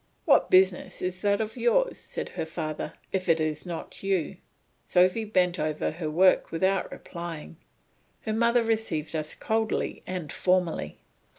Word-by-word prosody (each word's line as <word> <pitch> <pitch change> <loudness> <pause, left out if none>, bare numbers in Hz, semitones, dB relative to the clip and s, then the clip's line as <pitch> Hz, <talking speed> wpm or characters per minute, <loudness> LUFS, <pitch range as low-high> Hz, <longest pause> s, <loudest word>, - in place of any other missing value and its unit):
"What - - +5
business 185 0 +3
is 180 0 -3
that 200 -1 +2
of 220 0 -4
yours," 365 - +2
said - - -6
her 160 - -4
father, 155 -1 -4 0.2
"if 190 -1 -2
it 165 0 +4
is 155 +2 -2
not 170 -2 -6
you?" 190 -5 -1 0.5
Sophy 185 +5 +3
bent 185 -4 +1
over 155 0 -1
her 160 0 -4
work 185 +4 +4
without 190 +3 +1
reply. 170 -3 -7 0.7
Her 220 - -2
mother 235 +1 +3
received 220 -9 -1
us 155 -1 -2
coldly 220 0 -1
and 180 -5 -4
formally. 180 - 0
185 Hz, 150 wpm, -27 LUFS, 160-205 Hz, 0.7 s, What